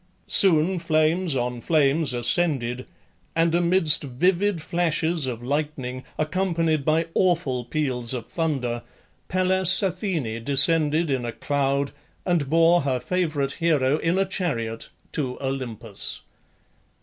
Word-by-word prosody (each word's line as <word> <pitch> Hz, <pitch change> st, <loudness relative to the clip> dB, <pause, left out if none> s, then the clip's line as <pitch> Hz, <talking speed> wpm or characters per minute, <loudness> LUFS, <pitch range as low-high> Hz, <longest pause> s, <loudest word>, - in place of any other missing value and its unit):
Soon 180 Hz, -1 st, +4 dB
flames 160 Hz, 0 st, +1 dB
on 125 Hz, -1 st, -2 dB
flames 150 Hz, -1 st, +2 dB
ascended, 125 Hz, -1 st, 0 dB, 0.5 s
and 165 Hz, 0 st, +2 dB
amidst 170 Hz, -3 st, +4 dB
vivid 180 Hz, +8 st, 0 dB
flashes 165 Hz, -2 st, 0 dB
of 120 Hz, -2 st, -5 dB
lightning, 135 Hz, -2 st, -3 dB
accompanied 165 Hz, -2 st, 0 dB
by 160 Hz, +3 st, +1 dB
awful 165 Hz, -9 st, +1 dB
peals 125 Hz, -3 st, -2 dB
of 125 Hz, -4 st, -3 dB
thunder, 135 Hz, -8 st, -2 dB, 0.5 s
Pallas 185 Hz, +1 st, +2 dB
Athene 175 Hz, -, -2 dB
descended 150 Hz, +3 st, +2 dB
in 130 Hz, -2 st, -1 dB
a 120 Hz, -, -3 dB
cloud, 140 Hz, +1 st, -1 dB, 0.3 s
and 170 Hz, -7 st, 0 dB
bore 165 Hz, +2 st, +4 dB
her 135 Hz, -2 st, -1 dB
favourite 155 Hz, -5 st, -1 dB
hero 150 Hz, -4 st, +1 dB
in 165 Hz, +3 st, 0 dB
a 195 Hz, -, +2 dB
chariot 115 Hz, -13 st, -3 dB, 0.2 s
to 130 Hz, -5 st, -3 dB
Olympus. 120 Hz, -6 st, -5 dB
155 Hz, 115 wpm, -24 LUFS, 130-170 Hz, 0.5 s, Soon